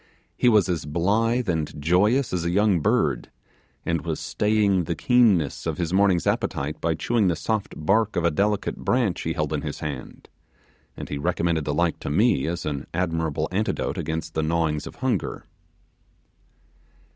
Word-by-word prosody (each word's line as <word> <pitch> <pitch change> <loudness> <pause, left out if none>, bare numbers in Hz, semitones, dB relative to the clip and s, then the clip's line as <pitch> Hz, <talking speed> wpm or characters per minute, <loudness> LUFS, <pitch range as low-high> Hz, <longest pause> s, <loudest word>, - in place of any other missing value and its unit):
He 125 - +3
was 105 -5 +4
as 85 -6 -2
blithe 110 +9 +1
and 80 -4 -2
joyous 100 - +2
as 90 -2 -1
a 85 - 0
young 100 0 +3
bird, - - +1 0.6
and 85 -1 -1
was 80 -2 -3
staying 105 -4 +1
the 85 - -2
keenness 105 - +2
of 80 - -2
his 85 -1 -2
morning's 95 -3 +3
appetite 70 +3 -1
by 80 -1 +1
chewing 110 +6 +1
the 85 - +2
soft 105 +5 -2
bark 100 +7 +1
of 90 - 0
a 85 - +3
delicate 100 +5 0
branch 120 -7 0
he - - -2
held - - -2
in - - -1
his - - -5
hand, 70 -4 -7 0.7
and - - -7
he 70 - -3
recommended 80 +1 0
the 75 - -1
like 85 +1 +1
to - - -5
me 80 - +2
as 85 +1 -3
an 70 -2 -3
admirable 80 -3 -1
antidote 100 -1 -1
against 80 0 -4
the 80 - 0
gnawings 80 -2 0
of - - -10
hunger. 120 - -2
85 Hz, 170 wpm, -24 LUFS, 80-105 Hz, 0.7 s, was